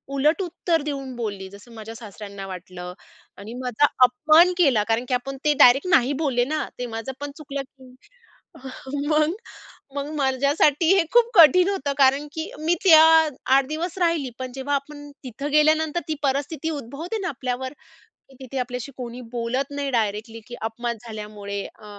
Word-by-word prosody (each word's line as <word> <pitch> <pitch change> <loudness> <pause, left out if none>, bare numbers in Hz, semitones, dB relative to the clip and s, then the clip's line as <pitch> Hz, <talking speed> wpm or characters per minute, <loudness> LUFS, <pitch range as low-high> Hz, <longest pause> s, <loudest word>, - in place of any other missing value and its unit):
उलट 300 +7 +2
उत्तर 345 -2 -1
देऊन 275 -3 -5
बोलली 200 -5 -5
जसं 200 +4 -15
माझ्या 220 0 -9
सासऱ्यांना 200 -3 -9
वाटलं. 180 -1 -8 0.4
आणि 210 +4 -9
माझा 250 +2 +1 0.2
अपमान 310 +8 +5
केला. 265 -12 +3
कारण 225 +2 0
की 255 - -2
आपण 270 +2 -2
ते 300 - +4
डायरेक्ट 270 +8 +6
नाही 265 -2 +3
बोलले 250 -5 +1
ना. 310 - 0 0.2
ते 250 - -2
माझं 225 +4 -5
पण 290 0 -5
चुकलं 280 -2 -5
की 260 -1 -19 1.1
मग 305 +2 +2 0.6
मग 285 +1 -3
माझ्यासाठी 280 +4 +2
हे 365 - +4
खूप 475 -1 +5
कठीण 355 +3 +7
होतं. 285 -8 -2
कारण 275 +2 +3
की 320 0 -5
मी 330 +3 +1
त्या 320 -4 +8 0.2
अ, - - -2 0.3
8 310 +7 -1
राहिली, 335 -6 +1
पण 255 -1 -5
जेव्हा 280 +2 -1
आपण 290 +1 -6 0.2
तिथं 275 +4 -5
गेल्यानंतर 310 +2 +3
ती 310 - 0
परिस्थिती 285 +3 -1
उद्भवते 290 - -6
ना 365 - -2
आपल्यावर, 260 0 -4 0.6
की - - -17
तिथे 260 +1 -6
आपल्याशी 250 +2 -4
कोणी 245 -1 -7
बोलत 245 +4 -2
नाही 280 -1 -2
डायरेक्टली 225 0 -2
की 240 - -8 0.2
अपमान 235 0 -4
झाल्यामुळे 210 -2 -6
अ, 215 - -17
270 Hz, 165 wpm, -23 LUFS, 240-305 Hz, 1.1 s, त्या